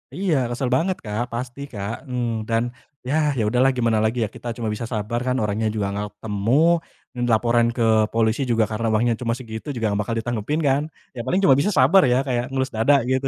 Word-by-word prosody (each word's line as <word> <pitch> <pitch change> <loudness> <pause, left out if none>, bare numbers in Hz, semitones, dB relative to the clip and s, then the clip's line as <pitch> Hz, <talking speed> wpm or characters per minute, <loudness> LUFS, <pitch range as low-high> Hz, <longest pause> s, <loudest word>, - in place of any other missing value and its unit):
Iya, 185 -4 +1
kesel 125 +1 -2
banget 180 +6 0
Kak, 105 +2 -2
pasti 125 +3 -5
Kak, 105 +8 -5
mmm, 120 -3 -2
dan 115 0 +1 0.4
ya 145 - 0 0.2
ya 110 - +1
udah 125 +2 0
lah 135 - +5
gimana 115 -2 +2
lagi 115 +1 +1
ya 105 - -2
kita 120 - -9
cuma 115 -2 -4
bisa 110 - -5
sabar 110 +3 -2
kan 125 - +1
orangnya 105 +1 0
juga 105 -2 -1
gak 105 0 -2
ketemu, 105 +1 -3 0.7
n - - 0
laporan 120 +1 +3
ke 120 - 0 0.3
polisi 115 +3 +1
juga 115 -1 +3
karena 115 +1 -1
uangnya 115 +2 +2
cuma 115 -2 -1
segitu 115 +1 -8
juga 110 -3 0
gak 100 - -1
bakal 115 +2 -3
ditanggepin 120 +6 -2
kan, 135 +2 +3 0.3
ya - - -7
paling 185 - +2
cuma 135 -7 +6
bisa 205 +9 +1
sabar 145 +10 +6
ya, 125 - +4
kayak 120 -1 0
ngelus 130 0 -1
dada 130 +6 +4
gitu. 130 +2 0
120 Hz, 215 wpm, -22 LUFS, 110-130 Hz, 0.7 s, cuma